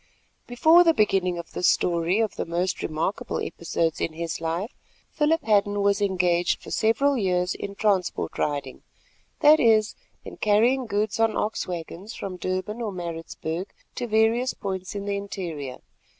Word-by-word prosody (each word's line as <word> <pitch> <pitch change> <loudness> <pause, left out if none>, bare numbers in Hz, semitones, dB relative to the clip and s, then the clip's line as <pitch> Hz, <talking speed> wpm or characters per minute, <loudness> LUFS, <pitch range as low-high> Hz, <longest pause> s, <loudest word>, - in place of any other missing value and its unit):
Before 320 +8 +6
the 330 -2 +4
beginning 190 -4 +2
of 170 -1 -8
this 180 - +1
story 170 +2 +2
of 220 -3 -1
the - - -3
most 175 +2 -1
remarkable 160 +5 -2
episodes 165 -1 -2
in 160 - -1
his 165 0 -4
life, 170 +7 -2 0.4
Philip 320 +2 +1
Hadden 205 -1 +2
was 200 0 +2
engaged 180 -3 +1
for - - -9
several 265 +5 +2
years 180 -2 +1
in 200 0 -6
transport 195 -4 0
riding—that 145 - 0
is, 220 -2 +4 0.3
in - - -9
carrying 235 +5 +2
goods 210 0 -1
on 225 -1 +2
ox 215 - -2
waggons 180 +4 -6
from 185 -2 -6
Durban 185 +5 -3
or 220 -3 -2
Maritzburg 170 0 -5 0.3
to 245 - -4
various 225 +3 +2
points 190 -1 -5
in 200 0 -4
the 200 0 -1
interior. 165 -10 -5
200 Hz, 150 wpm, -25 LUFS, 175-220 Hz, 0.4 s, Before